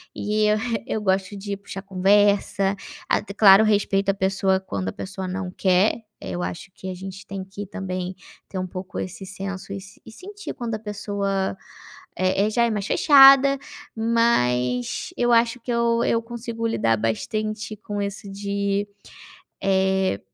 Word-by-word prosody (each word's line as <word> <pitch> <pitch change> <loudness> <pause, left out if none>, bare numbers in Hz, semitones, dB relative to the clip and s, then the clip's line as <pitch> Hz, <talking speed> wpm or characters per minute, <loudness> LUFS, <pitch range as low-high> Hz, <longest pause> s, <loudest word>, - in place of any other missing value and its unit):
e 210 +1 0
eu 210 0 +3 0.3
eu 215 - -2
gosto 190 0 0
de 200 0 -4
puxar 195 -1 -8
conversa. 200 0 +2 0.3
Ah, - - +3 0.2
claro 200 0 +8
respeito 200 -2 +2
à - - +4
pessoa 190 0 +1
quando 100 - -4
a - - -7
pessoa 190 -1 -6
não 185 0 -3
quer, 190 +5 +2 0.2
eu 90 -1 -4
acho 90 - -6
que 190 - -7
a 185 - -4
gente 190 +1 -8
tem 195 -1 -5
que 195 +2 -7
também 185 -1 -4 0.4
ter 190 - -4
um 185 - -3
pouco 185 +1 -6
esse 185 +1 -6
senso 195 0 -6
e 195 +3 -10
sentir 405 - -8
quando 235 -3 -4
a - - -5
pessoa, 200 -2 -2 0.6
eh 185 +2 +2
eh, - - 0
já 235 +2 +2
é - - +1
mais 205 -2 -2
fechada. 275 -1 +7 0.4
Mas 125 - +1
eu 240 0 +2
acho 230 +1 +3
que 245 - -4
eu 235 0 +2
eu 230 - +1
consigo 230 0 -4
lidar 115 - +1
bastante 215 - -2
com 205 0 -5
isso 200 0 -5
de, 200 0 -1 0.7
eh, 190 - +1
200 Hz, 160 wpm, -23 LUFS, 190-215 Hz, 0.7 s, claro